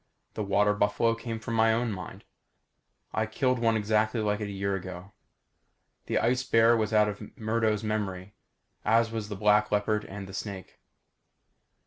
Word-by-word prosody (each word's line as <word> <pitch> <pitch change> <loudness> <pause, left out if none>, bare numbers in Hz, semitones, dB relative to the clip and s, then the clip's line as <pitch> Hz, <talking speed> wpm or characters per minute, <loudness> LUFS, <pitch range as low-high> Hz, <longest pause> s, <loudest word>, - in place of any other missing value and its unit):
The - - -4
water 105 +1 +2
buffalo 105 +3 +2
came 115 0 -5
from 115 +1 -5
my 115 0 +4
own 115 +1 0
mind. 95 -3 -8 0.9
I 110 - 0
killed 125 +2 0
one 115 -1 +2
exactly 110 +2 +1
like 105 -1 0
it 105 - -3
a - - -6
year 100 0 -1
ago. 95 +1 -8 0.9
The - - 0
ice 125 +1 +1
bear 115 -1 +4
was 110 -1 0
out 105 -1 +4
of 105 0 -5 0.2
Murdo's 110 -1 0
memory 100 -3 -3 0.5
as 115 +1 +3
was 110 -2 -4
the 105 - -4
black 105 +1 +3
leopard 105 +1 +1
and 100 0 -8
the 95 - -10
snake. 95 -2 -7
105 Hz, 165 wpm, -28 LUFS, 100-115 Hz, 0.9 s, my